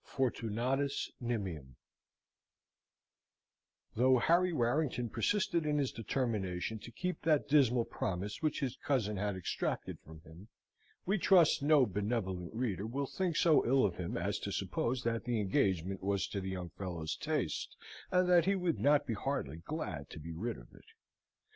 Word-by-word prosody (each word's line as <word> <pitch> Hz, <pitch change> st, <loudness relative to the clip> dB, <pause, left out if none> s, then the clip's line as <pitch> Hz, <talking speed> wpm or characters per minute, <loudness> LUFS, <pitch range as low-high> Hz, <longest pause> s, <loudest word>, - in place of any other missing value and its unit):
Fortunatus 130 Hz, +2 st, -1 dB
Nimium 95 Hz, -, -3 dB, 2.2 s
Though 130 Hz, +2 st, +4 dB
Harry 175 Hz, +8 st, +3 dB
Warrington 125 Hz, -3 st, 0 dB
persisted 185 Hz, -5 st, +1 dB
in 150 Hz, -1 st, 0 dB
his 140 Hz, -3 st, 0 dB
determination 110 Hz, -4 st, -2 dB
to 120 Hz, -, -10 dB
keep 180 Hz, +7 st, -3 dB
that 155 Hz, -2 st, +2 dB
dismal 125 Hz, -5 st, +4 dB
promise 95 Hz, +3 st, -3 dB
which 155 Hz, -2 st, 0 dB
his 130 Hz, -2 st, -1 dB
cousin 110 Hz, -7 st, 0 dB
had 105 Hz, 0 st, -1 dB
extracted 95 Hz, -, -3 dB
from 80 Hz, +1 st, -13 dB
him, 80 Hz, +6 st, -14 dB, 0.6 s
we 195 Hz, +3 st, +1 dB
trust 175 Hz, -5 st, +5 dB
no 145 Hz, -2 st, +5 dB
benevolent 100 Hz, -4 st, -2 dB
reader 110 Hz, -4 st, -2 dB
will 140 Hz, +5 st, -2 dB
think 180 Hz, +3 st, -2 dB
so 160 Hz, -2 st, +5 dB
ill 130 Hz, +1 st, +4 dB
of 95 Hz, -, -1 dB
him 90 Hz, -2 st, -3 dB
as -, -, -1 dB
to -, -, -4 dB
suppose 125 Hz, +1 st, -1 dB
that 115 Hz, -1 st, -1 dB
the 120 Hz, -2 st, 0 dB
engagement 95 Hz, -2 st, 0 dB
was 100 Hz, 0 st, 0 dB
to 100 Hz, -, -3 dB
the 95 Hz, -, -4 dB
young 90 Hz, -2 st, -5 dB
fellow's 85 Hz, -5 st, -4 dB
taste, 150 Hz, -, -2 dB, 0.3 s
and 180 Hz, 0 st, +3 dB
that 175 Hz, -2 st, +5 dB
he 195 Hz, +1 st, +3 dB
would 180 Hz, -3 st, 0 dB
not 145 Hz, 0 st, +4 dB
be 120 Hz, -, -2 dB
heartily 100 Hz, -, -3 dB
glad 85 Hz, -, -5 dB
to -, -, -9 dB
be 80 Hz, +2 st, -7 dB
rid 90 Hz, -, -3 dB
of -, -, -15 dB
it. -, -, -17 dB
120 Hz, 160 wpm, -33 LUFS, 95-145 Hz, 2.2 s, trust